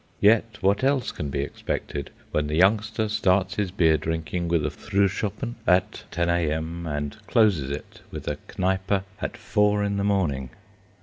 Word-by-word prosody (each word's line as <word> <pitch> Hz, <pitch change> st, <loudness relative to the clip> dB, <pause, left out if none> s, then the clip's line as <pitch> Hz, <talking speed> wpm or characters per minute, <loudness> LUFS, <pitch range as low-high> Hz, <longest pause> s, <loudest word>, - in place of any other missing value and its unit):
Yet 110 Hz, +1 st, +4 dB
what 100 Hz, +5 st, +2 dB
else 135 Hz, -1 st, +2 dB
can 75 Hz, -, -4 dB
be 70 Hz, 0 st, -1 dB
expected, 70 Hz, 0 st, -4 dB, 0.2 s
when 75 Hz, -1 st, 0 dB
the 75 Hz, -, -1 dB
youngster 110 Hz, +4 st, +3 dB
starts 95 Hz, -3 st, +2 dB
his 105 Hz, -3 st, 0 dB
beer 80 Hz, -4 st, +3 dB
drinking 80 Hz, +3 st, -2 dB
with 85 Hz, -2 st, +1 dB
a 75 Hz, -, -1 dB
"Fruhschoppen" 100 Hz, +5 st, -1 dB
at 90 Hz, 0 st, +2 dB
10 85 Hz, +1 st, 0 dB
a.m., 85 Hz, 0 st, -1 dB
and 75 Hz, -1 st, -3 dB
closes 100 Hz, -, +3 dB
it 70 Hz, +1 st, -7 dB
with -, -, -8 dB
a -, -, -1 dB, 0.2 s
"Kneipe" 95 Hz, +1 st, +1 dB, 0.2 s
at 120 Hz, -, -3 dB
four 105 Hz, -1 st, +2 dB
in 100 Hz, 0 st, 0 dB
the 100 Hz, -, 0 dB
morning? 80 Hz, -11 st, 0 dB
95 Hz, 165 wpm, -25 LUFS, 80-105 Hz, 0.2 s, Yet